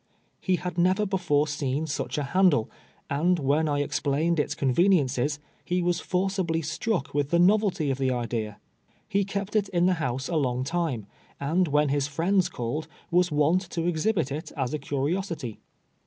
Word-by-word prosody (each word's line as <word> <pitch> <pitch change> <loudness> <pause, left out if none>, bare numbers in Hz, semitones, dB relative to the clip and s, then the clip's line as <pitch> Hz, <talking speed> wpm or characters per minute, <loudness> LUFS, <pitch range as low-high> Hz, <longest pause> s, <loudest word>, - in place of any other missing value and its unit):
lie 185 - +5
had 180 0 -4
never 185 +4 +3
before 170 -7 +1
seen 145 0 -2
such 150 - -3
a 150 - 0
handle, 155 - +3 0.4
and 170 +6 +2
when 150 +2 +1
I 145 0 +1
explained 145 +3 0
its 150 - 0
conveni 170 +8 +4
ences, 140 +2 -1 0.3
he 180 0 0
was 175 0 +1
forcibly 180 -3 -1
struck 155 +1 -2
with 145 -1 0
the 170 - +3
novelty 180 -4 +3
of 135 - -3
the 135 -1 +1
idea. 115 -4 -3 0.5
lie 200 +1 +3
kept 200 +1 -4
it 205 -2 +2
in 175 -1 +2
the 185 - +4
house 130 0 -2
a 170 - -1
long 130 -3 0
time, 155 - -2 0.3
and 165 +6 +1
when 150 0 +2
his 140 0 +1
fiiends 175 +6 +1
called, 125 +7 -3 0.2
was 180 0 +3
wont 150 +5 +3
to 165 -1 -2
exhibit 175 -2 0
it 150 +3 -5
as 130 -1 -1
a 150 - -1
curiosity. 145 - -3
155 Hz, 175 wpm, -26 LUFS, 140-180 Hz, 0.5 s, lie